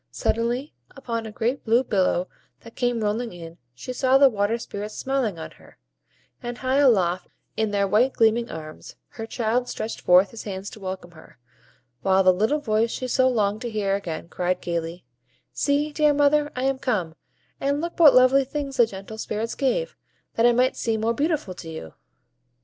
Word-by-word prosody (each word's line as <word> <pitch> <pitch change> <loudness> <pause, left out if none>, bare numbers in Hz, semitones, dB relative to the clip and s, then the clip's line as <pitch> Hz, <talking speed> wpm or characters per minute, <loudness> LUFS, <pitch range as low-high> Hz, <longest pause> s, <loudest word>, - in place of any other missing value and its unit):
Suddenly, 240 +6 -1 0.2
upon 230 -4 -4
a - - -8
great 240 +4 -2
blue 235 +3 +3
billow 185 -5 +1 0.3
that 230 - -14
came 245 -2 0
rolling 225 +3 -1
in, 170 -1 -10 0.2
she 250 - -6
saw 260 +1 +3
the 275 0 +7
Water 205 +2 0
Spirits 210 -2 -7
smiling 260 -9 -1
on 160 - -7
her; - - -19 0.6
and 240 0 -5
high 260 +1 0
aloft, 190 -10 +3 0.3
in 220 -1 0
their 200 -1 +1
white 230 +7 +3
gleaming 230 +1 +2
arms, 155 -1 -9
her 225 -1 -8
child 240 +1 -1
stretched 220 - -5
forth 180 +2 +5
his 230 - -8
hands 195 -1 -6
to - - -11
welcome 185 -2 -6
her; 160 -2 -17 0.6
while 190 +2 +3
the 185 0 +6
little 215 +11 +1
voice 220 -2 +1
she 255 - -4
so 260 +1 +3
longed 215 -3 0
to 240 - -3
hear 205 -3 -1
again 170 -4 -5
cried 180 +1 -1
gayly,— 170 -1 -4 0.5
"See, 295 +1 0
dear 300 -1 +3
mother, 290 +1 +3
I 255 - -2
am 270 0 0
come; 195 -12 -1 0.5
and 280 +1 0
look 340 +2 -5
what 295 -6 +8
lovely 255 +2 +6
things 275 0 -5
the 235 - +5
gentle 200 +2 -9
Spirits 220 +1 -3
gave, 485 - -1 0.4
that 230 +1 +4
I - - +6
might 250 +2 +2
seem 220 -2 -1
more 230 +1 +1
beautiful 290 - -1
to 170 -2 -10
you." 160 - -8
230 Hz, 185 wpm, -24 LUFS, 195-260 Hz, 0.6 s, what